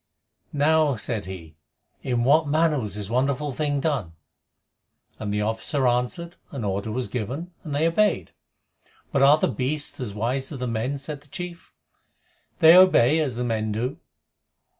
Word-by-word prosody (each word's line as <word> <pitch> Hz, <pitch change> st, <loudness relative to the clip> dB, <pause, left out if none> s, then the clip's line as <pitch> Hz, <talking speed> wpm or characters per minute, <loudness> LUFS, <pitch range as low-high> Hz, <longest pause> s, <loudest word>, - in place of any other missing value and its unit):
"Now," 150 Hz, -1 st, +3 dB
said 110 Hz, -1 st, -4 dB
he, 85 Hz, -5 st, -9 dB, 0.4 s
"in 120 Hz, -2 st, 0 dB
what 150 Hz, +4 st, +4 dB
manner 155 Hz, 0 st, +2 dB
was 105 Hz, -5 st, -4 dB
this 105 Hz, -2 st, -5 dB
wonderful 140 Hz, +5 st, 0 dB
thing 145 Hz, 0 st, -1 dB
done?" 130 Hz, -, -1 dB, 1.1 s
And 105 Hz, -1 st, -3 dB
the 105 Hz, 0 st, 0 dB
officer 110 Hz, +5 st, -1 dB
answered, 125 Hz, +9 st, -1 dB
"An 135 Hz, -5 st, -6 dB
order 100 Hz, +2 st, -2 dB
was 125 Hz, +3 st, -2 dB
given, 130 Hz, -, -4 dB
and 150 Hz, -3 st, -4 dB
they 155 Hz, +3 st, +2 dB
obeyed." 165 Hz, -, +1 dB, 0.8 s
"But 140 Hz, -, +1 dB
are 140 Hz, +2 st, +7 dB
the -, -, +1 dB
beasts 140 Hz, +4 st, -3 dB
as 110 Hz, -6 st, -5 dB
wise 130 Hz, +6 st, -1 dB
as 145 Hz, -, -5 dB
the 125 Hz, -, -3 dB
men?" 120 Hz, +4 st, -2 dB
said 145 Hz, +1 st, -7 dB
the 150 Hz, -, -23 dB
chief. 175 Hz, +3 st, -8 dB, 0.9 s
"They 165 Hz, +2 st, +9 dB
obey, 160 Hz, -6 st, +6 dB
as 140 Hz, -6 st, -1 dB
the 125 Hz, -, -2 dB
men 110 Hz, -2 st, -1 dB
do. 115 Hz, +4 st, -3 dB
130 Hz, 160 wpm, -24 LUFS, 110-150 Hz, 1.1 s, They